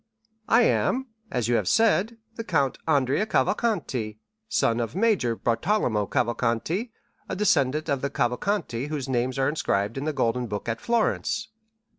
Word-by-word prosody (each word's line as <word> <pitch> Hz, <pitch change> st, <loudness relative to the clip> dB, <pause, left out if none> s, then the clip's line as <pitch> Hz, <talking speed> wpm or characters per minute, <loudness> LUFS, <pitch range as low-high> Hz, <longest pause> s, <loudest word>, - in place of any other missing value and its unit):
"I 240 Hz, +2 st, +5 dB
am 265 Hz, +2 st, +1 dB, 0.2 s
(as 125 Hz, -3 st, -1 dB
you 120 Hz, -, +1 dB
have -, -, -1 dB
said) 225 Hz, 0 st, +3 dB, 0.2 s
the 230 Hz, -, -5 dB
Count 145 Hz, -, 0 dB
Andrea 145 Hz, +6 st, +2 dB
Cavalcanti, 135 Hz, -, 0 dB, 0.3 s
son 115 Hz, 0 st, +2 dB
of 115 Hz, +4 st, -3 dB
Major 195 Hz, -, +2 dB
Bartolomeo 115 Hz, -, 0 dB
Cavalcanti, 125 Hz, -, -1 dB, 0.4 s
a -, -, -2 dB
descendant 155 Hz, -7 st, +2 dB
of 140 Hz, -2 st, 0 dB
the 140 Hz, -, -1 dB
Cavalcanti 125 Hz, -, -1 dB
whose 145 Hz, -3 st, -4 dB
names 130 Hz, 0 st, -1 dB
are 135 Hz, 0 st, +2 dB
inscribed 115 Hz, -6 st, -1 dB
in 140 Hz, -, -4 dB
the 155 Hz, -, 0 dB
golden 125 Hz, -2 st, 0 dB
book 105 Hz, 0 st, -5 dB
at 115 Hz, 0 st, -2 dB
Florence. 230 Hz, -1 st, 0 dB
140 Hz, 150 wpm, -25 LUFS, -, 0.4 s, I